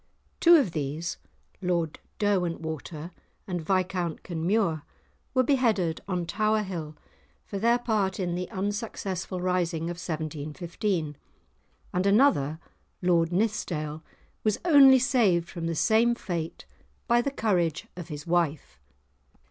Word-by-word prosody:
Two 345 0 +8
of 275 - +3
these, 155 +2 -3 0.4
Lord 170 -4 -1 0.2
Derwentwater 165 -5 -2 0.3
and 180 -5 -3
Viscount 180 -1 -1
Kenmure, 170 -1 0 0.5
were 255 - +5
beheaded 225 - +1
on 180 -3 -1
Tower 215 +5 +1
Hill 165 -6 -5 0.5
for 200 - -5
their 235 +3 +4
part 210 -6 0
in 175 -2 -1
the 180 +1 -3
unsuccessful 195 -2 -3
rising 175 -2 0
of 175 +1 -7
1715, 155 +1 -3 0.8
and 180 +1 0
another, 200 - +4 0.5
Lord 170 -2 +3
Nithsdale, 175 -7 -1 0.4
was 215 -2 +2
only 275 -5 +8
saved 225 -10 +2
from 170 -3 -5
the 165 - -1
same 230 +6 +3
fate 170 -7 -5 0.4
by 240 -1 +4
the 280 - -1
courage 180 - 0
of 175 -2 -7
his 150 -3 -7
wife. 165 - -1
180 Hz, 120 wpm, -27 LUFS, 165-215 Hz, 0.8 s, Two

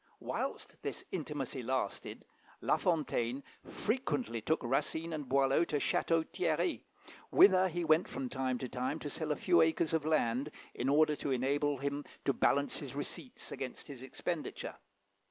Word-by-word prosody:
Whilst - - -4
this - - -4
intimacy 145 -6 -3
lasted, 125 -4 -3 0.3
La - - +2
Fontaine 140 -6 0 0.2
frequently 235 - -1
took 160 +6 0
Racine 160 +6 0
and 150 -4 -4
Boileau 135 +3 +4
to 155 - -3
Château 160 +3 +2
Thierry, 180 - 0 0.5
whither 190 -1 +7
he 175 -1 -2
went 160 +2 +4
from 135 - -4
time 130 0 -1
to 130 - -4
time 130 +4 -2
to 145 -2 -5
sell 155 -2 -2
a - - +2
few 175 +1 +4
acres 160 0 +2
of 160 -2 +2
land, 145 -3 +1 0.2
in 125 - -1
order 150 +1 +4
to 145 - -3
enable 140 +3 +1
him 140 +2 -2 0.2
to 140 - +3
balance 140 +2 +2
his 140 -2 -6
receipts 185 - -5
against 130 -2 -5
his 135 -4 -9
expenditure. 130 - -4
145 Hz, 155 wpm, -34 LUFS, 130-160 Hz, 0.5 s, whither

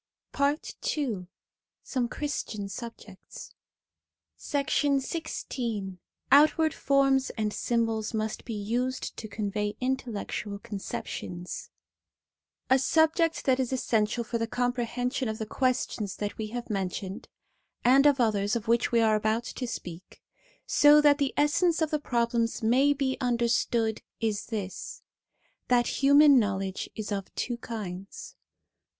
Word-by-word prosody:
PAKT 285 +3 -1
II 220 -11 -2 0.6
SOME 250 -3 -1
CHRISTIAN 230 -9 -4
SUBJECTS 215 -2 -9 0.9
XVI 270 - -1 0.3
OUTWARD 310 +2 +5
FORMS 275 -1 +2
AND 210 -1 -1
SYMBOLS 225 -2 0
MUST 215 0 -2
BE 230 - -5
USED 240 +5 -2
TO 220 - -7
CONVEY 210 0 -3
INTELLECTUAL 235 -5 -3
CON 205 -1 -7
CEPTIONS 175 -2 -6 1.0
A 265 - +6
SUBJECT 320 +4 +2
that 260 -1 +3
is 260 -1 -1
essential 235 -2 0
1 - - -19
for 235 - 0
the 230 - -1
comprehension 245 +1 -1
of 220 - -3
the 220 - -4
questions 230 -4 -1
that 205 0 -4
we 220 - -4
have 240 +1 -5
mentioned, 190 0 -4 0.6
and 270 +4 +6
of 285 -2 +3
others 210 -3 +2
of 225 -2 -3
which 235 +2 +2
we 235 -1 +4
are 220 -1 +4
about 215 +2 +1
to 250 +1 -5
speak, 180 -5 -8 0.5
so 295 +1 +6
that 290 -1 +5
the 280 -2 +1
essence 325 +3 +3
of 315 -2 0
the 305 - +1
problems 235 -3 0
may 260 +6 +4
be 270 -2 0
understood, 235 -2 +1 0.2
is 215 -3 -1
this: 205 -5 -5 0.6
that 245 +1 +2
human 285 0 +7
knowledge 195 -3 -2
is 215 -1 -5
of 195 -1 -3
two 240 -1 -2
kinds. 195 -5 -7
235 Hz, 130 wpm, -28 LUFS, 210-270 Hz, 1.0 s, human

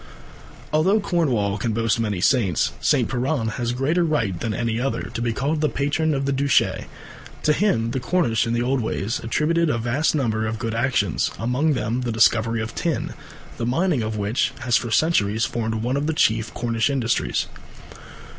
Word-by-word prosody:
Although 185 +8 +3
Cornwall 125 - 0
can 110 +2 -1
boast 115 0 +1
many 105 -5 -1
saints, 100 - +2
St. - - +2
Piran 125 -1 -1
has 120 +2 -2
greater 140 +8 +1
right 115 - 0
than 115 - -2
any 115 0 -1
other 135 +2 -1
to - - -3
be 120 0 0
called 150 +6 -1
the 150 - +2
patron 150 +2 0
of 135 0 -1
the 140 - 0
Duchy. 140 -1 +1 0.6
To 150 - +4
him 115 - +1
the 130 - -1
Cornish 120 -4 +1
in 115 - -1
the 120 0 0
old 130 -1 0
days 110 0 -2
attributed 155 +8 +1
a 120 - +1
vast 120 +8 0
number 110 -6 0
of 110 +1 -3
good 115 -1 -3
actions, 115 - +1
among 130 +7 +1
them 120 0 -1
the 120 -2 -2
discovery 110 +1 +2
of 110 - -6
tin, 165 -4 -2 0.4
the 115 - -2
mining 160 +1 +1
of 110 0 -3
which 105 +4 0
has 120 -2 +1
for 120 - +1
centuries 115 -5 +2
formed 110 -1 -2
one 125 +3 0
of 145 +2 -1
the 160 - 0
chief 110 -4 +2
Cornish 115 +1 0
industries. 115 - 0
120 Hz, 185 wpm, -23 LUFS, 110-145 Hz, 0.6 s, To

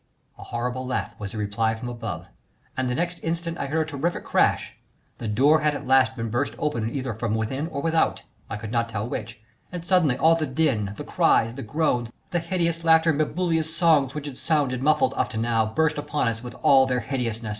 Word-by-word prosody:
A - - -8
horrible 125 +2 -3
laugh 130 - -2
was 100 -2 -5
the - - -5
reply 110 +2 0
from 110 +2 -6
above, 115 -3 -5 0.5
and 130 -1 -1
the 125 - -1
next 175 +3 -2
instant 165 0 -3
I 140 - -2
heard 155 +2 0
a - - -8
terrific 160 +5 -2
crash; - - +1 0.4
the 115 - -4
door 140 +9 +4
had 150 -1 +1
at 145 - -6
last 130 0 +4
been 115 -2 -4
burst 120 +5 -1
open 115 -7 -1
either 130 -1 -3
from 110 0 -2
within 130 +7 -2
or 140 -4 -5
without, 165 0 +1 0.3
I 100 - -3
could 110 0 -7
not 115 -1 0
tell 110 -1 -3
which, 110 -3 -5 0.3
and 175 -2 -6
suddenly 170 -8 +3
all 160 +3 +5
the 160 -2 0
din, 130 -8 0
the - - -6
cries, 115 +1 +2
the 135 - -7
groans, 130 -6 0 0.2
the 175 - +1
hideous 170 -1 -1
laughter 165 0 +5
and 145 - -2
bibulous 160 0 0
songs 155 -6 +3
which 150 -1 -4
had 140 -3 -7
sounded 140 -6 +1
muffled 155 - +3
up - - 0
to - - -5
now 115 -1 +1
burst 150 +6 +1
upon 145 -3 -1
us 115 0 -4
with 120 -1 -8
all 135 -3 +6
their 125 -1 0
hideousness. 115 -5 -3
135 Hz, 220 wpm, -25 LUFS, 115-160 Hz, 0.5 s, all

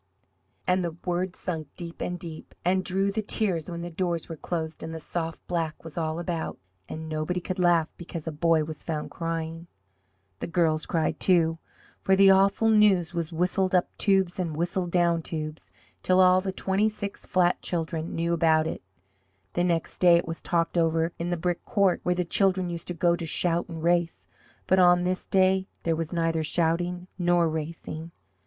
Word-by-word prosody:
And 180 0 +2
the 170 -1 -4
words 180 +1 -1
sunk 160 -5 -4
deep 170 -1 -7
and 180 - -2
deep 165 -2 -8
and 185 +1 +2
drew 195 +2 +1
the 215 +2 -1
tears 190 -6 -1
when 170 -1 -5
the 175 - -6
doors 170 -1 -2
were 165 - -6
closed 160 0 -4
and 160 0 -6
the - - -5
soft 165 0 -4
black 165 -3 -3
was 165 -2 -9
all 160 -1 -2
about 170 -1 -3 0.3
and 160 0 -6
nobody 155 +3 -2
could 185 +1 -5
laugh 170 -3 +4
because 170 -2 -7
a 160 - -3
boy 160 +1 +2
was 155 -1 -7
found 155 -2 -4
crying! 165 0 -4 0.7
The - - -4
girls 165 -3 +1
cried 160 -2 0
too 165 -3 +3 0.4
for 190 - +3
the 195 0 +7
awful 195 +3 +4
news 205 -6 +4
was 170 -1 -3
whistled 185 +3 +1
up 180 - +1
tubes 190 -3 +2
and 165 -4 -2
whistled 175 +1 -1
down 170 -1 +2
tubes, 155 - -6 0.3
till 185 0 +3
all 185 0 +6
the 190 0 -2
twenty 195 +3 +1
six 205 -2 -7
flat 180 -1 +2
children 165 -1 -3
knew 170 +1 0
about 160 -1 +3
it. 160 - -4 0.7
The 175 - +1
next 170 -2 -1
day 175 -2 +7
it 170 - -2
was 165 0 -5
talked 170 0 0
over 165 0 +1
in 170 +1 -2
the 175 - 0
brick 175 +1 -2
court, 195 -3 +2
where 180 - 0
the 180 0 -1
children 185 0 +1
used 170 -1 -6
to 175 - -3
go 170 +1 +3
to 170 -1 -5
shout 170 +2 0
and 165 -1 -6
race. 170 -1 +1 0.4
But 190 - +3
on 175 -1 +6
this 185 +1 -1
day 190 0 +3 0.2
there 165 -1 +1
was 165 0 -3
neither 165 -2 0
shouting 175 +3 0
nor 175 -1 +3
racing. 160 0 -5
170 Hz, 190 wpm, -27 LUFS, 165-180 Hz, 0.7 s, the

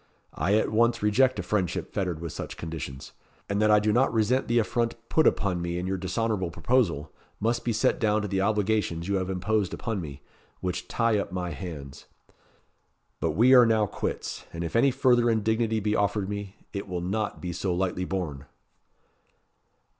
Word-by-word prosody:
"I 100 +3 +1
at 110 - +1
once 115 +1 +2
reject 125 +4 +3
a 95 - -2
friendship 90 -2 -1
fettered 90 -5 -2
with 85 -3 -4
such - - -6
conditions. 75 -5 -6 0.4
And 100 +1 0
that 110 - +4
I 105 - +7
do 105 0 +1
not 130 +4 +3
resent 115 +4 +1
the 120 - +2
affront 115 +1 +1
put 160 - +4
upon 90 -3 +1
me 85 0 -2
in 90 - -3
your 95 0 -2
dishonourable 95 0 -1
proposal, 85 - 0 0.3
must 115 +2 0
be 120 - 0
set 110 0 +1
down 105 -1 +2
to - - -2
the 95 -1 0
obligations 105 -4 0
you 100 0 +1
have 95 0 -2
imposed 95 +1 0
upon 110 -5 -3
me, 80 - -5
and - - -13 0.4
which 90 -1 -3
tie 115 -3 +1
up 100 - -4
my 90 -1 -3
hands. 75 -5 -8 1.1
But - - 0
we 125 +5 +5
are 125 -2 +8
now 110 -2 +3
quits; - - -4
and 85 +1 -5
if 85 - -5
any 120 +4 +5
further 125 -3 +3
indignity 110 0 +1
be 105 0 0
offered 100 -1 0
me, 100 -1 -5 0.2
it 100 -1 -4
will 90 -2 -3
not 100 +4 -2
be 90 -1 -4
so 90 +2 -2
lightly 90 0 -1
borne." 75 -8 -4
100 Hz, 190 wpm, -27 LUFS, 90-110 Hz, 1.1 s, are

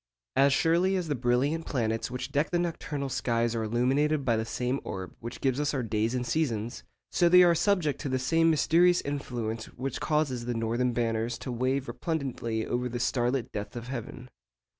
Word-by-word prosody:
As 135 +1 +5
surely 170 +6 +3
as 180 -4 -2
the - - +2
brilliant 130 +6 0
planets 115 -4 -1
which 125 +2 -5
deck 145 +2 +1
the 175 - +1
nocturnal 155 -5 -2
skies 120 -3 0
are 115 - -1
illuminated 135 +6 +1
by 115 - +3
the 110 0 -1
same 125 +3 -1
orb 95 -1 -6
which 120 - -7
gives 135 0 +1
us 150 0 0
our 130 - -1
days 110 +2 0
and 125 -1 -1
seasons, 120 -4 -1 0.3
so 175 - +3
they 180 +1 +8
are 175 -1 +6
subject 170 -5 +1
to 145 - -3
the 130 - +1
same 165 +6 +3
mysterious 170 +3 +4
influence 120 -6 -4
which 130 0 -5
causes 145 -6 0
the 120 0 -2
northern 115 +2 0
banners 115 0 -1
to 130 - -6
wave 130 +3 -1
resplendently 130 -9 -3
over 125 +1 -1
the 120 0 -4
star 120 0 +1
lit 130 -3 -2
depths 105 +2 -5
of 120 +1 -6
heaven. 125 0 -6
130 Hz, 195 wpm, -28 LUFS, 120-150 Hz, 0.3 s, they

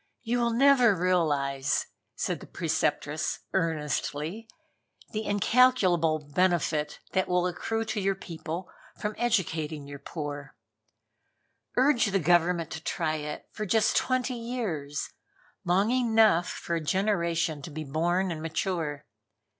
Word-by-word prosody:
"You 245 +1 0
will 235 0 +2
never 250 -3 +5
realize," 150 -6 +1 0.3
said - - -2
the - - -11
Preceptress - - -1
earnestly, 160 +5 -2 0.6
"the 215 -1 -3
incalculable 185 -8 +3
benefit 160 -4 +1
that 190 -1 +1
will 180 0 +2
accrue 225 +5 -2
to 220 -1 -2
your 195 0 +1
people 170 0 -6 0.3
from 210 0 -3
educating 160 -10 0
your 140 0 -9
poor. 145 -2 -6 1.2
Urge 255 -3 +4
that 195 0 +1
Government 175 0 +3
to 160 - -5
try 155 -2 -1
it 150 0 -6
for 215 - -4
just 215 +3 +3
twenty 255 0 +1
years, 215 - -3 0.5
long 190 +6 +2
enough 225 -8 +4
for 170 - -4
a 165 - -1
generation 170 -3 0
to 140 - -7
be 155 +1 -5
born 175 +6 0
and 160 -2 -5
mature. 160 -3 -2
175 Hz, 125 wpm, -28 LUFS, 155-215 Hz, 1.2 s, never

